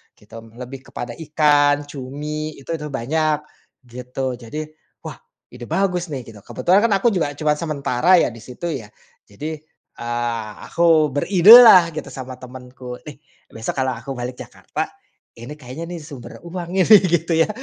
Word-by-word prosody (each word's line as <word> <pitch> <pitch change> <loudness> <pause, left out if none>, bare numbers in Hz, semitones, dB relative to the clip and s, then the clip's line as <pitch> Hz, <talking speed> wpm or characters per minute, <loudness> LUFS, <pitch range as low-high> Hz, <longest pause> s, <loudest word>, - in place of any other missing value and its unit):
gitu. 105 +2 -17 0.2
Lebih 125 +2 -8
kepada 120 - -6
ikan, 145 -2 +2
cumi, 150 +3 -6
itu 140 - -8
itu 150 -1 -6
banyak 150 +4 0 0.5
gitu. 125 +1 -5
Jadi 120 +6 -7 0.4
wah - - -8 0.3
ide 125 0 -9
bagus 180 +1 0
nih 135 -3 -4
gitu. 110 -2 -13
Kebetulan 185 +3 +2
kan - - -4
aku 195 - +1
juga 165 -7 -1
cuma 150 0 +1
sementara 155 +1 +2
ya - - +1
di 115 - -12
situ 130 +9 -6
ya. 120 -9 -6 0.4
Jadi, 155 +10 -6 0.4
eee, 120 -2 -3 0.2
aku 165 -3 +3
beridelah 185 - +8
gitu 155 - -6
sama 130 -1 -8
temenku, 125 0 -10
"Nih 150 -3 -10 0.3
besok 115 0 -5
kalau 130 -1 0
aku 125 +4 -7
balik 125 0 -6
Jakarta, - - -6 0.5
ini 120 +5 -8
kayaknya 140 +4 -8
nih 175 -1 -6
sumber 145 -5 -10
uang 170 0 -6
nih," 185 - +4 0.2
gitu 170 0 +1
ya. 165 +4 +3
145 Hz, 155 wpm, -20 LUFS, 125-165 Hz, 0.5 s, beridelah